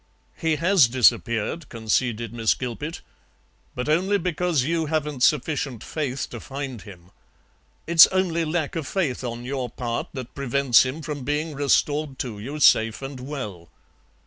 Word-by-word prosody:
"He 160 -1 0
has 170 -2 +4
disappeared," 120 +3 +1
conceded 115 0 -1
Miss 115 -2 +1
Gilpet, 140 +7 -5 0.7
"but 125 +2 -3
only 185 +7 +2
because 175 -5 0
you 165 +2 -1
haven't 150 -3 -2
sufficient 140 -3 +1
faith 140 -4 -3
to 120 - -6
find 135 -2 -6
him. 90 -3 -14 0.7
It's 165 -1 +8
only 180 -3 0
lack 160 -1 -2
of 160 -4 -3
faith 155 -11 -1
on 120 0 -5
your 130 -1 -3
part 120 0 -4
that 130 -4 -7
prevents 140 -2 +3
him 150 +5 -6
from 145 -4 -5
being 150 +3 -2
restored 145 0 +1
to 115 -6 -5
you 140 +8 -6
safe 115 -3 +4
and 135 -1 -6
well." 110 - -7
140 Hz, 145 wpm, -24 LUFS, 120-155 Hz, 0.7 s, It's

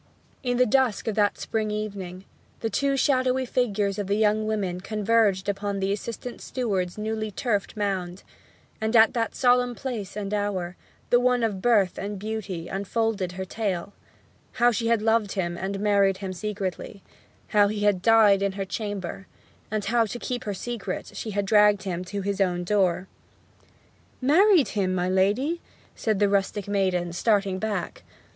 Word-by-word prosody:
In 245 -1 -1
the 250 - +5
dusk 250 -3 +1
of 220 - +1
that 205 0 +2
spring 215 -1 -2
evening 195 -3 -5 0.4
the 225 - -2
two 275 +5 +1
shadowy 260 -1 +2
figures 210 -5 0
of 200 - -2
the 200 - +1
young 215 0 +2
women 190 -5 -2
converged 210 -2 +1
upon 200 0 -2
the 195 0 0
assistant 230 +4 -5
steward's 195 -8 -2
newly 215 0 -2
turfed 210 -1 -2
mound; 190 -3 -2 0.6
and 220 +2 0
at 225 -1 +6
that 230 -2 -1
solemn 245 -1 +3
place 220 -7 -5
and 205 0 -3
hour, 195 -4 -2 0.4
the 245 - +6
one 250 -1 +2
of 205 -4 -1
birth 210 -6 +3
and 205 +1 -4
beauty 200 -5 -5
unfolded 200 -1 -1
her 190 +1 -5
tale: 200 -2 -3 0.6
how 240 0 +4
she 230 +1 -1
had 230 -2 +2
loved 220 -2 +2
him 175 -3 -2
and 195 +2 -4
married 200 -2 +3
him 190 -1 -5
secretly; 195 0 -5 0.5
how 205 -1 +5
he 210 0 -3
had 205 -3 +2
died 215 -2 +5
in 200 -1 0
her 195 0 -3
chamber; 195 -2 -5 0.4
and 215 -1 -2
how, 230 +2 +3
to 225 - -5
keep 245 0 -4
her 205 - -2
secret, 220 -3 -5
she 225 - -5
had 205 -1 -1
dragged 210 -1 +4
him 180 -2 -3
to 200 +2 -4
his 200 0 -1
own 180 -2 +1
door. 185 -1 +1 1.1
'Married 330 +4 +5
him, 190 -3 0
my 180 0 0
lady!' 205 - +1 0.3
said 215 -3 0
the 205 +1 +3
rustic 200 0 0
maiden, 185 -4 0
starting 195 0 +1
back. 205 -3 -3
205 Hz, 165 wpm, -25 LUFS, 195-225 Hz, 1.1 s, at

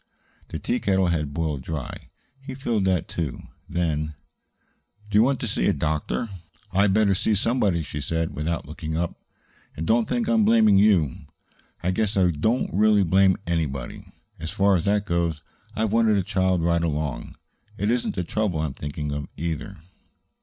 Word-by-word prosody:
The - - -5
tea - - -1
kettle 95 -2 +2
had 75 -4 -1
boiled 75 -2 -2
dry. 75 -1 -6 0.3
He 135 -1 -7
filled 115 -7 0
that, 90 -4 +1
too. 75 -7 -4 0.3
Then: 75 -3 -1 1.0
"Do 105 - +5
you - - +7
want 130 +2 +2
to - - -2
see - - 0
a - - +3
doctor?" 80 +9 -1 0.4
"I'd 100 +1 +3
better 100 0 +3
see 105 +3 +1
somebody," 100 -6 +1
she 75 0 -5
said, 80 +2 -2
without 80 +3 -2
looking 80 +1 -5
up. 85 0 -1 0.6
"And 80 - -3
don't 115 +4 +2
think 120 -2 0
I'm 115 -2 +3
blaming 110 -2 +5
you. 90 -6 +2 0.6
I 90 - +1
guess 105 +1 0
I 90 -2 +4
don't 110 - 0
really 105 0 +4
blame 95 +2 +4
anybody. 75 -7 -2 0.4
As 80 - -5
far 100 0 +3
as 85 - 0
that 100 0 +2
goes, 85 -3 -1 0.3
I've 110 -1 0
wanted 115 -2 +4
a 95 - +1
child 95 -3 +1
right 85 0 +2
along. 75 -3 -3 0.4
It 100 +3 +1
isn't 120 0 -1
the 90 - -1
trouble 90 -3 -1
I - - 0
am 70 - -4
thinking 75 +1 -5
of 70 0 -4
either." 85 +4 -4
90 Hz, 175 wpm, -24 LUFS, 80-105 Hz, 1.0 s, you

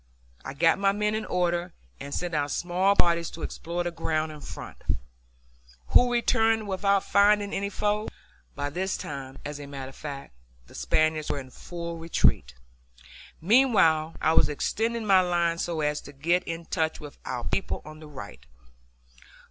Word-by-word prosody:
I 135 - -6
got 165 +4 +4
my 195 0 +3
men 210 +1 0
in 215 0 -2
order 175 0 0 0.3
and 140 - -7
sent 175 +3 -3
out 145 -1 0
small 180 +6 +1
parties 170 -3 +3
to 165 - -9
explore 170 +1 -3
the 175 - -2
ground 160 -1 -1
in 150 -1 -10
front, 80 - -8 1.1
who 245 0 +5
returned 225 -2 +2
without 195 0 +2
finding 205 0 +3
any 200 +1 -1
foe. 210 +1 -1 0.5
(By 145 0 -3
this 190 +4 -1
time, 135 -1 -7
as 145 0 -5
a 145 - -8
matter 135 -2 -6
of 135 - -14
fact, 140 - -7 0.3
the - - -18
Spaniards 155 - +1
were - - 0
in 130 -1 -10
full 170 +1 -6
retreat.) 65 - +2 0.9
Meanwhile 165 -7 +4
I 160 - +3
was - - +5
extending 225 +9 -1
my 190 -2 +6
line 170 -2 +1
so 165 -2 -2
as 150 0 0
to 145 - -12
get 170 +6 +1
into 165 0 -6
touch 160 0 0
with 145 -2 -10
our 125 -2 -4
people 195 - -2
on 155 0 -10
the 155 - -11
right. 130 -9 -10
170 Hz, 170 wpm, -27 LUFS, 150-195 Hz, 1.1 s, my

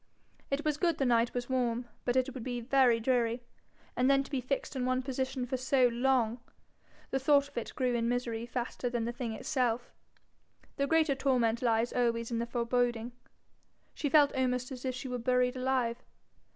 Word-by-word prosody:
It 280 +3 -2
was 300 -1 +1
good 335 -2 +1
the 270 - +1
night 235 -1 +2
was 245 0 -2
warm, 245 -2 -1 0.2
but 245 - +1
it 260 0 +1
would 255 - -7
be 245 -1 -3
very 245 -1 +3
dreary. 240 0 +1 0.5
And 255 +2 +2
then 275 0 +4
to - - -14
be 270 -3 -1
fixed 275 +3 -3
in 260 - -1
one 255 +1 0
position 260 -1 -2
for 260 +1 -2
so 255 0 +3
long! 240 -1 +1 0.7
The 270 - +1
thought 280 +1 +4
of 285 - -22
it 235 - -4
grew 250 -1 0
in 235 -1 0
misery 235 -2 -2
faster 245 +1 -3
than 240 -2 -2
the 235 - -2
thing 240 -2 -4
itself. 245 -2 -1 0.9
The 280 0 +1
greater 320 -1 +3
torment 250 -4 +1
lies 230 -1 +1
always 235 -1 0
in 230 - -1
the 235 - -2
foreboding. 240 0 0 0.8
She 290 - -2
felt 290 0 +5
almost 250 0 0
as 255 0 -7
if 255 -1 -1
she 265 +1 -6
were 250 -1 -3
buried 250 +1 +1
alive. 255 -2 0
250 Hz, 190 wpm, -31 LUFS, 235-265 Hz, 0.9 s, felt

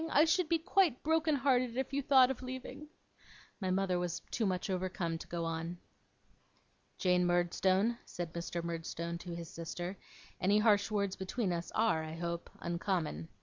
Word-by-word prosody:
I 300 +1 +5
should 325 0 +2
be 335 - +4
quite 345 -4 +2
broken 320 0 +2
hearted 255 -3 +2
if 265 +1 -2
you 280 - +1
thought 260 -1 +6
of 265 - -6
leaving 260 +4 -7 0.4
' - - -23
My 190 - 0
mother 185 -1 +1
was 175 -2 -2
too 220 - +1
much 185 +1 -1
overcome 180 -3 -2
to - - -9
go 170 -1 -3
on. 165 +1 -3 1.2
'Jane 180 -1 +3
Murdstone,' 185 +5 +2
said 175 -2 -6
Mr. 170 0 -3
Murdstone 170 0 -4
to 175 -1 -6
his 170 -1 -6
sister, 175 +3 -5 0.4
'any 200 +3 +3
harsh 210 -1 +4
words 200 -3 0
between 190 0 -1
us 170 0 -4
are, 215 -8 +2
I 155 0 -6
hope, 170 0 -4
uncommon. 170 - -1
185 Hz, 170 wpm, -34 LUFS, 170-245 Hz, 1.2 s, thought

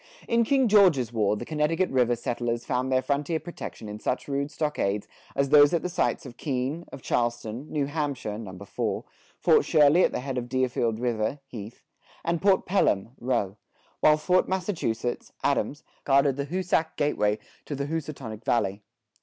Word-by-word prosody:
[72:1] - - -21
In 235 0 +4
King 265 0 +3
George's 175 - +4
War, 105 -2 +1
the 120 - -6
Connecticut 160 +5 0
River 125 -2 +3
settlers 120 0 -2
found 130 +1 -1
their 130 0 +2
frontier 145 +3 0
protection 170 -10 -8
in 105 0 -7
such 125 - -2
rude 140 0 -1
stockades 150 -10 -1 0.3
as 140 0 +1
those 145 +2 +7
at 165 - -1
the 180 - -1
sites 170 - 0
of 125 -3 -10
Keene, 140 +4 -2
of 130 - -10
Charlestown, 120 +2 -2
New 145 -2 0
Hampshire 140 -8 -3
(Number 100 -3 -8
Four), - - -2 0.3
Fort - - +4
Shirley 150 +3 +5
at - - +3
the - - -3
head 130 -1 -2
of 120 0 -7
Deerfield 120 -3 0
River 120 +1 -1
(Heath), 110 -3 -9 0.4
and 170 -1 0
Fort 195 -1 +3
Pelham 145 - +2
(Rowe); 115 -6 -1 0.4
while 150 0 +5
Fort 180 +4 +2
Massachusetts 165 - -2
(Adams) 145 +1 0 0.2
guarded 140 -1 +3
the 140 0 -2
Hoosac 175 -1 0
gateway 105 -8 +1 0.3
to 145 - -4
the 140 +1 -2
Hoosatonic 140 -8 -5
Valley. 100 -4 0
135 Hz, 170 wpm, -27 LUFS, 120-155 Hz, 0.4 s, those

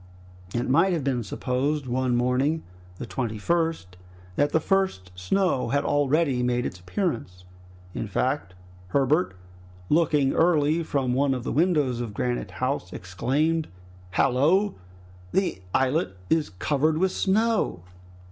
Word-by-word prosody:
It 120 +1 0
might 165 +8 +4
have 160 -5 -1
been 130 -3 0
supposed 135 +6 -1
one 125 0 0
morning 130 +6 +1 0.3
the - - -5
21 115 -5 -3
st 160 - -1 0.4
that 145 +6 +2
the 160 - +3
first 185 - 0
snow 130 - 0
had 140 +1 +1
already 145 -2 +2
made 125 0 0
its 90 - -5
appearance. 90 - -3 0.5
In 115 - -4
fact 115 -2 -1 0.3
Herbert 140 - +1 0.5
looking 150 -4 +3
early 160 -1 +3
from 135 -6 -1
one 135 +1 +2
of 125 - -5
the - - -3
windows 150 -6 +2
of 110 -4 -5
Granite 125 +2 -2
House, 130 -8 -2
exclaimed, 140 - -1 0.5
"Hallo! 155 - +3 0.6
the 190 - 0
islet 130 - +1
is 160 -2 +2
covered 145 - 0
with 185 +2 +2
snow!" 210 - +1
135 Hz, 130 wpm, -25 LUFS, 120-160 Hz, 0.6 s, might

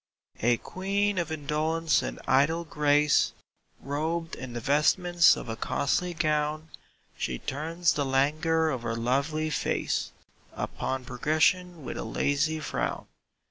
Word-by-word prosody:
A 120 +1 +3
Queen 200 - -1
of 165 -2 -2
indolence 155 +2 0
and - - -5
idle 145 +6 +3
grace, 150 -1 +3 0.5
Robed 160 +4 -3
in 130 -2 -6
the 120 - -3
vestments 170 +6 +4
of - - -7
a 115 - -3
costly 175 +9 -1
gown, 155 0 0 0.5
She 60 - -3
turns 165 - -1
the 145 - 0
languor 155 +4 +2
of 130 -4 -3
her 115 -1 -2
lovely 140 +7 0
face - - -1 0.4
Upon 130 -1 -3
progression 155 +6 +1
with - - -5
a - - -3
lazy 145 +7 0
frown. 155 - -3
150 Hz, 130 wpm, -28 LUFS, 140-165 Hz, 0.5 s, vestments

